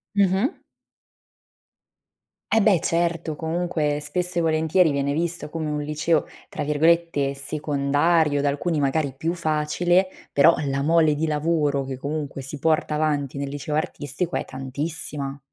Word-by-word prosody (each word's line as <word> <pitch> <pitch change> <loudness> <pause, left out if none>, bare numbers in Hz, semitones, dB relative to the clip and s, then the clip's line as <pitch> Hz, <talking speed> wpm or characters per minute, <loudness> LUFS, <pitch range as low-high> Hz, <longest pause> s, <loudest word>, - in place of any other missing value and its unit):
Mh-mh. 200 - +2 1.9
E 225 - +4
beh, 200 -4 +4
certo, 170 -2 0
comunque 160 -2 -1
spesso 180 +4 -3
e - - +2
volentieri 160 +1 +3
viene 140 0 0
visto 170 +2 -2
come 160 -1 -3
un 150 0 -2
liceo 150 +2 0 0.2
tra - - -4
virgolette 150 -1 +2
"secondario", 145 +2 +1
da 145 - +1
alcuni 150 +3 0
magari 140 0 0
più 165 +4 -1
facile, 170 +3 +1 0.2
però 160 +4 +6
la 135 0 -1
mole 160 +1 +4
di 155 +2 -1
lavoro 150 -2 +1
che 135 -1 -5
comunque 145 0 -4
si 135 +3 -6
porta 155 +1 +1
avanti 145 -3 -1
nel 140 0 -3
liceo 145 +1 -4
artistico 155 +2 -2
è - - -3
tantissima. 140 +1 -4
150 Hz, 140 wpm, -24 LUFS, 145-170 Hz, 1.9 s, però